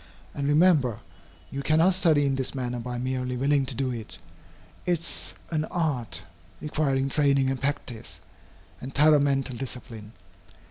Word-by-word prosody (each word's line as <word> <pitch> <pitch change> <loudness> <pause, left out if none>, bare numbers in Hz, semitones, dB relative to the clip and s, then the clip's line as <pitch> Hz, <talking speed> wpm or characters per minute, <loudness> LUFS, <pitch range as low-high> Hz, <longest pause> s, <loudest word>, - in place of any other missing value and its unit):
And, 140 0 -2
remember, 145 - +4 0.5
you 140 - -3
cannot 160 +6 +4
study 160 -6 +4
in 135 - +1
this 130 +1 -3
manner 125 -2 -2
by 125 +1 -4
merely 125 0 -2
willing 140 +1 +2
to 130 - -2
do 130 0 -1
it. 115 -3 -6 0.7
It 175 -3 +1
is 170 - -5 0.2
an 155 -1 0
art, 125 - -2 0.4
requiring 140 -3 0
training 140 -2 +2
and 135 - -3
practice, 135 -4 -4 0.6
and 130 +2 -8
thorough 150 +1 +6
mental 135 -2 +1
discipline. 115 -4 -7
135 Hz, 145 wpm, -26 LUFS, 125-150 Hz, 0.7 s, thorough